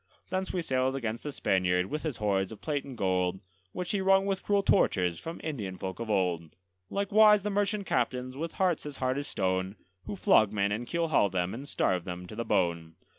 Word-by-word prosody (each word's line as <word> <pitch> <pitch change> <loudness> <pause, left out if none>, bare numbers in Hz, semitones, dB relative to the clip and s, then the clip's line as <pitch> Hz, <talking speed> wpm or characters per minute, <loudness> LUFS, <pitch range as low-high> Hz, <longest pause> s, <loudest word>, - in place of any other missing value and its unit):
Thence 190 0 -1
we 180 -2 -2
sailed 130 -2 0
against 115 -3 -3
the 150 - -5
Spaniard 90 -6 +1
with 150 +9 -4
his 155 -7 -3
hoards 95 -3 0
of 110 - -9
plate 145 -3 -2
and 135 -3 -9
gold, 95 -1 0 0.3
Which 180 -1 -4
he 200 -2 0
wrung 195 0 +4
with 195 -1 -1
cruel 200 -1 +1
tortures 90 - +2
from 165 +1 -7
Indian 105 - -4
folk 95 +2 -5
of 115 -1 -5
old; 90 -5 0 0.3
Likewise 210 +1 +5
the 210 - -1
merchant 205 0 0
captains, 125 -1 -1
with 165 +4 -4
hearts 180 -5 0
as 145 -2 -7
hard 130 +1 0
as 145 - -5
stone, 95 +1 -1 0.3
Who 105 - -3
flog 100 +2 +4
men 100 -1 0
and 115 +4 -3
keelhaul 155 - +2
them, 90 0 -1
and 135 +5 -7
starve 90 -2 +1
them 90 0 -6
to - - -10
the 115 - -2
bone. 85 -5 0
120 Hz, 210 wpm, -29 LUFS, -, 0.3 s, Likewise